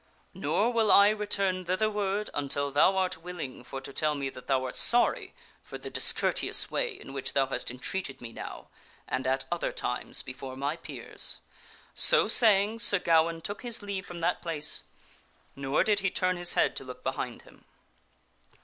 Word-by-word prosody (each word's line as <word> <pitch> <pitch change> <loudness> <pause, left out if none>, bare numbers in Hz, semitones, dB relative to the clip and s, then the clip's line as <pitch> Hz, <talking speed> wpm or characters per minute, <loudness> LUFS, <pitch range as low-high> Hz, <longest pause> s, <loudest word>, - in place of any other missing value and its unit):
Nor 245 - 0
will 225 -3 +3
I 200 +1 +8
return 200 -3 -1
thitherward 205 +2 0
until 140 0 -2
thou 165 +7 +4
art 185 -1 0
willing 165 -8 -7
for 135 - -6
to 135 - -9
tell 150 +1 0
me 135 -1 -3
that 125 - -12
thou 130 -2 +2
art 125 - -5
sorry 240 0 +3 0.3
for - - -9
the - - -9
discourteous - - +1
way - - +1
in 135 - -10
which 135 -1 -3
thou 135 - +3
hast 135 - -2
entreated 135 +4 -4
me 115 -1 -8
now - - -8 0.4
and 130 0 -2
at 135 +1 0
other 175 - -1
times 125 - -2
before 130 0 -7
my 140 +3 -1
peers." - - -3 0.6
So - - +4
saying, 215 -1 +4
Sir 205 -3 +6
Gawaine 165 -1 +2
took 205 +4 -5
his 235 -4 -1
leave 200 -1 -4
from 175 -1 -8
that 175 +2 0
place, 150 -3 0 0.7
nor 135 +1 +1
did 210 -2 +2
he 195 - +1
turn 185 0 0
his 175 0 -2
head - - +2
to - - -5
look - - -10
behind - - -4
him. - - -20
175 Hz, 175 wpm, -29 LUFS, 135-200 Hz, 0.7 s, I